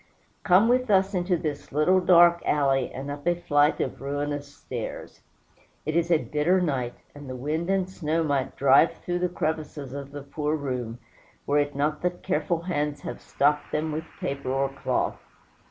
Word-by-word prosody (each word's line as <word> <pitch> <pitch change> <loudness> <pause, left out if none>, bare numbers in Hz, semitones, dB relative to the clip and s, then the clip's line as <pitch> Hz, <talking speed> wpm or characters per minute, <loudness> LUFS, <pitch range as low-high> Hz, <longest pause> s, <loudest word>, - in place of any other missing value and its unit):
Come 190 +4 +5
with 250 0 +2
us 195 0 +3
into 180 -1 +1
this 150 -3 -5
little 155 +6 +4
dark 175 -1 +6
alley, 135 -3 +1
and 140 +2 -6
up 145 +3 -7
a 175 - +4
flight 150 -3 +2
of - - -3
ruinous 145 +1 -3
stairs. 125 -4 -7 0.6
It 155 +2 -2
is 170 0 +2
a 170 - +5
bitter 155 +5 +1
night, 130 -8 -1 0.2
and 145 -2 -10
the 130 - -5
wind 155 +7 -2
and 195 -1 +1
snow 165 -3 -1
might 140 -3 -1
drive 140 +4 +5
through 175 0 -3
the 180 0 0
crevices 155 -5 -3
of 140 0 -7
the 145 -1 -7
poor 150 +2 -2
room, 125 -5 -4 0.5
were 145 +1 +2
it 145 -1 -1
not 150 +2 0
that 180 0 -2
careful 160 +3 0
hands 150 -4 -2
have - - -6
stopped 150 +1 +1
them 155 +1 -1
with 155 +1 -3
paper 140 -1 -3
or 135 +1 +1
cloth. 135 0 -2
150 Hz, 180 wpm, -26 LUFS, 140-175 Hz, 0.6 s, dark